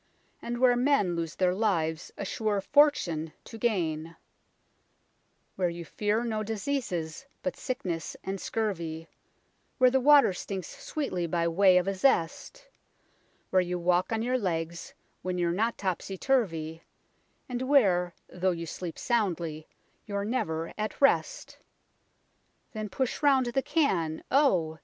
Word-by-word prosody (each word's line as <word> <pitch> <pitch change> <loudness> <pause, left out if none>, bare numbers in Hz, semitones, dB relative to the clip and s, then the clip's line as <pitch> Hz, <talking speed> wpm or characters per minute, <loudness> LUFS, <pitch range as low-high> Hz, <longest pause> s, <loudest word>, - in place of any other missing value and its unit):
And 240 0 -4
where 245 0 +5
men 245 -8 +2
lose 165 -2 -3
their 180 -1 +2
lives 170 -6 0
a 200 - -4
sure 210 0 -1
fortune 190 - +2
to 225 - -10
gain; 165 -8 -1 1.4
Where 180 -2 +1
you 170 0 -7
fear 210 +6 0
no 220 -2 -2
diseases 215 - -3 0.2
but 275 - -2
sickness 180 - -4
and 195 0 -4
scurvy; 165 -7 -3 0.7
Where 255 -1 +5
the 265 - +3
water 280 -5 +6
stinks 185 -1 -5
sweetly 185 - -2
by 170 0 0
way 185 +2 +5
of 180 +1 +1
a 195 - +1
zest; 185 - 0 0.8
Where 185 - +5
you 180 0 -2
walk 175 +2 +1
on 225 0 0
your 255 +1 +1
legs 170 -4 -3 0.3
when 185 0 -3
you're 175 -1 +1
not 225 +6 0
topsy 190 0 -3
turvy; 165 - 0 0.7
And 245 -1 -4
where, 195 -11 +3
though 180 +1 -1
you 170 -2 -2
sleep 170 +1 -6
soundly, 170 -9 -1 0.4
you're 200 -1 -2
never 165 -9 -2
at 215 0 -3
rest. - - +1 1.1
Then 215 -2 -5
push 255 +5 -2
round 275 -3 +4
the 240 +3 0
can 180 - 0
oh 180 - +3
190 Hz, 140 wpm, -28 LUFS, 170-240 Hz, 1.4 s, water